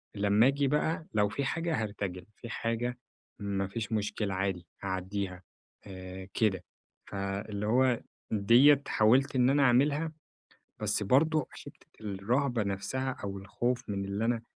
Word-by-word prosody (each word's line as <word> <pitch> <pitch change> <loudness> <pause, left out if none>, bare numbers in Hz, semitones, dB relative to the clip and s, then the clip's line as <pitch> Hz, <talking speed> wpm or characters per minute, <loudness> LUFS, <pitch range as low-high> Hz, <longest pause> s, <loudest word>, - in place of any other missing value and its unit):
لما 105 +3 +4
أجي 140 +1 +2
بقى 155 +3 0
لو 105 -1 +3
في 140 +7 -2
حاجة 165 -2 -1
هارتجل. 100 -3 -4
في 115 - -9
حاجة 120 +1 -2 0.4
ما 100 -2 -1
فيش 110 +3 -5
مشكلة 105 -2 -1
عادي 95 -2 -2 0.2
هاعديها، 95 -1 -3 0.4
آآ 95 0 -8
كده. 95 -5 +1 0.4
فاللي 100 +1 -4
هو 125 +2 +3 0.3
دِيَّة 120 +8 +6
حاولت 130 +6 +3
إن 125 0 +4
أنا 140 +1 +4
أعملها 145 +5 +3 0.7
بس - - 0
برضو 150 +7 +3
حتة - - -13
الرهبة 115 +5 0
نفسها 105 +7 -2
أو 100 -1 -4
الخوف 120 +6 -2
من 100 -1 -2
اللي 100 +3 -2
أنا 115 -1 0
110 Hz, 135 wpm, -30 LUFS, 100-130 Hz, 0.7 s, دِيَّة